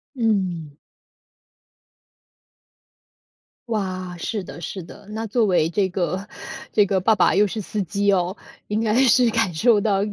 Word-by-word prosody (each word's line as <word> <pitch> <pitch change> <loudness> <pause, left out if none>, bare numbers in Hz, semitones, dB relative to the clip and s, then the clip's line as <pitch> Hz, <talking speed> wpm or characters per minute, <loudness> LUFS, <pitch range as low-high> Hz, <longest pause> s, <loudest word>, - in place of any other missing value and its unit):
嗯。 185 - -1 2.9
哇， 185 -4 -3
是 205 +5 -3
的 170 -1 -10
是 185 +4 -5
的， 200 +4 -13
那 220 +1 -4
作 225 +2 +1
为 180 -5 +2
这 190 +2 0
个 185 +2 -2 0.5
这 210 - +4
个 190 0 +1
爸 220 +4 +4
爸 - - +3
又 205 +2 +4
是 215 +3 -4
司 210 +1 -3
机 200 +3 0
哦， 185 -1 +1 0.3
应 210 +1 0
该 215 -1 +1
是 245 +1 +5
感 225 -5 +1
受 215 +7 +4
到 200 -1 +1
200 Hz, 155 characters per minute, -22 LUFS, 185-215 Hz, 2.9 s, 是